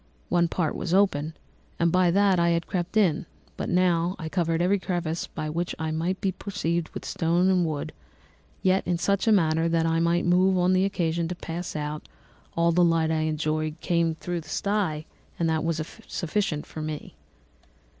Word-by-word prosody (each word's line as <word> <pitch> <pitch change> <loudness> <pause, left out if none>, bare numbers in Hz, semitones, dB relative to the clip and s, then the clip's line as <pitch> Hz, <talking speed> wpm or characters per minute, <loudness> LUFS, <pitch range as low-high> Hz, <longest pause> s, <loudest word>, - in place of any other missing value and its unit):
One 175 -1 +3
part 165 -2 -1
was 175 0 -1
open, 160 -6 +2 0.4
and 170 0 +2
by 180 0 +4
that 195 0 +3
I 170 0 +3
had 170 -1 +1
crept 180 +3 -2
in; 175 -7 +2 0.3
but - - -4
now 175 0 +2
I 160 -3 -5
covered 165 -2 0
every 190 +3 +2
crevice 175 -3 -2
by 155 - -5
which 170 +3 -2
I 160 0 -2
might 170 +4 -1
be 195 - 0
perceived 170 -4 -2
with - - -8
stones 170 +3 +1
and 180 -3 +3
wood, 150 -2 -4 0.7
yet 190 +1 +3
in 175 -1 +1
such 200 +4 0
a - - +6
manner 165 -4 +3
that 165 -1 +2
I 165 0 +2
might 170 +1 +2
move 185 +2 +4
them 180 - +2
on 185 +1 +4
occasion 170 -3 +1
to 180 - -4
pass 175 +1 -5
out; 150 0 -4 0.5
all 170 0 +4
the 175 +1 +4
light 165 -2 +3
I 160 - +1
enjoyed 155 +1 -1
came 170 -2 +1
through 175 +1 -4
the 155 - -15
sty, 185 -6 -1 0.3
and 170 - +1
that 160 -1 0
was 165 -1 0 0.3
sufficient 170 -3 -1
for 155 - -7
me. 155 -1 -5
170 Hz, 190 wpm, -26 LUFS, 160-185 Hz, 0.7 s, a